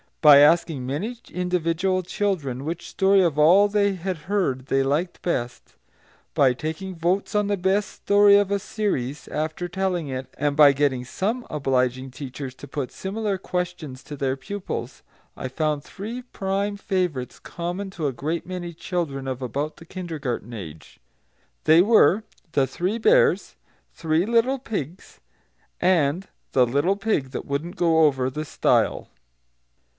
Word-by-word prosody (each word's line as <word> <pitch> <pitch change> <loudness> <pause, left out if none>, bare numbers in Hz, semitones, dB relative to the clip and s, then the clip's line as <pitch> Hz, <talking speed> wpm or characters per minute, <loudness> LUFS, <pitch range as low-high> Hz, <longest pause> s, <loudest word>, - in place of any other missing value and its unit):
By 150 -3 +9
asking 150 -3 +4
many 185 - -3
individual 180 +1 0
children 165 -10 -2
which 165 +3 -5
story 195 0 +4
of 165 -5 +1
all 180 +7 +6
they 200 -1 +2
had 185 0 -4
heard 140 -11 0
they 135 0 +2
liked 150 +6 -1
best, 125 - -3 0.6
by 140 -5 +4
taking 160 +8 -5
votes 175 +4 0
on 210 -1 +2
the 205 0 0
best 195 +3 +1
story 205 0 +5
of 200 -1 +1
a 200 - +1
series, 150 - -3
after 155 +3 -3
telling 180 -3 -2
it, 130 0 -4
and 145 0 0
by 145 -2 +7
getting 135 -3 0
some 220 - -2
obliging 130 -2 0
teachers 130 0 -7
to 145 - -11
put 135 -1 -4
similar 200 +1 -3
questions 180 -8 -4
to 150 - -8
their 135 -1 -1
pupils, 200 +9 -6 0.4
I - - -4
found 150 +2 -1
three 225 +9 -7
prime 200 -3 -2
favourites 180 -10 -2
common 175 +3 -5
to 165 -6 -2
a 135 - -2
great 155 +7 -3
many 175 -2 -5
children 160 -6 -3
of 130 0 -4
about 140 +5 -3
the 165 - -13
kindergarten 150 - -5
age. 80 -8 -10 0.6
They 160 +2 +6
were 210 -1 +5 0.3
The 140 -4 +2
Three 185 +10 -2
Bears, 470 - +3 0.4
Three 160 +1 0
Little 235 +4 +2
Pigs, 190 - -6 0.6
and 175 0 +2 0.3
The 130 -2 +5
Little 145 +10 +1
Pig 200 -10 -1
that - - -5
wouldn't 145 +5 -3
go 165 -2 +3
over 130 -3 +1
the 155 +4 -4
Stile. - - +1
165 Hz, 150 wpm, -24 LUFS, 140-195 Hz, 0.6 s, By